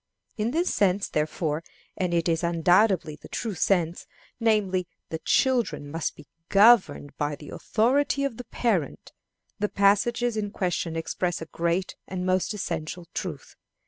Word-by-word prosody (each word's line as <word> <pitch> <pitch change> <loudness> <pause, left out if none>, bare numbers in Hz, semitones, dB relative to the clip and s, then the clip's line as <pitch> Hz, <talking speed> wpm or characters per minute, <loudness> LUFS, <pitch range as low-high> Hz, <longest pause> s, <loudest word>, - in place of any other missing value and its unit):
In 215 +1 -1
this 335 +7 0
sense, 195 0 +2
therefore 155 +1 -1 0.3
and 180 -2 -1
it 170 0 +1
is 165 -1 +1
undoubtedly 175 0 +3
the - - -13
true 225 -3 -3
sense 175 -1 0 0.3
namely, 200 -6 +1 0.2
that 160 0 -6
children 240 - +1
must 165 +1 -2
be 150 - -14 0.2
governed 200 -8 +5
by 145 0 -1
the 150 - -11
authority 275 +5 +1
of 275 -5 -2
the 250 - -7
parent, 195 - -1 0.5
the 210 0 0
passages 225 +4 +2
in 210 -1 -2
question 175 -4 -2
express 170 +2 -2
a 160 - -6
great 170 +3 -1
and 185 -1 -4
most 185 +1 +1
essential 170 -2 -4
truth. 155 -7 -6
185 Hz, 145 wpm, -26 LUFS, 165-215 Hz, 0.5 s, governed